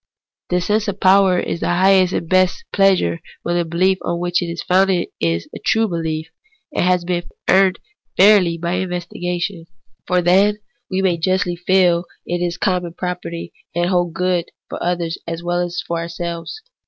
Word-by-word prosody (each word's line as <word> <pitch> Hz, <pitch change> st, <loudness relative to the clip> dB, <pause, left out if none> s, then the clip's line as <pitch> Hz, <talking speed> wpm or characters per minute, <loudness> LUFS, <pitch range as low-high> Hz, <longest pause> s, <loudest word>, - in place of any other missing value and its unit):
This 180 Hz, -1 st, 0 dB
sense 215 Hz, +1 st, +1 dB
of 200 Hz, 0 st, -3 dB
power 190 Hz, -1 st, +5 dB
is -, -, -3 dB
the -, -, -2 dB
highest 185 Hz, +1 st, +4 dB
and 170 Hz, -, -2 dB
best 185 Hz, -, +2 dB
of -, -, -47 dB
pleasures 190 Hz, -, +3 dB, 0.2 s
when 175 Hz, -, -1 dB
the 175 Hz, -, +2 dB
behef 185 Hz, +3 st, +1 dB
on 170 Hz, -, -2 dB
which 175 Hz, +1 st, 0 dB
it 175 Hz, -, -2 dB
is 170 Hz, 0 st, -5 dB
founded 185 Hz, -1 st, +2 dB
is 85 Hz, 0 st, -1 dB
a -, -, -6 dB
true 225 Hz, 0 st, +2 dB
behef, 160 Hz, -3 st, -3 dB, 0.5 s
and -, -, 0 dB
has 180 Hz, -1 st, +2 dB
been 175 Hz, -1 st, -1 dB, 0.2 s
fairly 190 Hz, -1 st, +4 dB, 0.4 s
earned 185 Hz, -4 st, +5 dB
by 170 Hz, 0 st, -1 dB
investigation. 175 Hz, -1 st, -3 dB, 0.4 s
For 180 Hz, -1 st, +2 dB
then 195 Hz, +4 st, +4 dB, 0.3 s
we 190 Hz, 0 st, -1 dB
may 180 Hz, -3 st, +2 dB
justly 185 Hz, +1 st, 0 dB
feel 180 Hz, -1 st, +2 dB, 0.2 s
that -, -, -4 dB
it 175 Hz, -, -1 dB
is 175 Hz, -1 st, -1 dB
common 180 Hz, -3 st, -1 dB
property, 175 Hz, -1 st, -5 dB, 0.2 s
and 175 Hz, +1 st, +1 dB
holds 175 Hz, -2 st, +1 dB
good 180 Hz, -2 st, 0 dB, 0.2 s
for -, -, -6 dB
others 175 Hz, -1 st, -2 dB
as 165 Hz, 0 st, -4 dB
well 175 Hz, 0 st, 0 dB
as 175 Hz, 0 st, -2 dB
for 170 Hz, 0 st, -2 dB
ourselves. 170 Hz, -, -5 dB
180 Hz, 180 wpm, -19 LUFS, 170-185 Hz, 0.5 s, power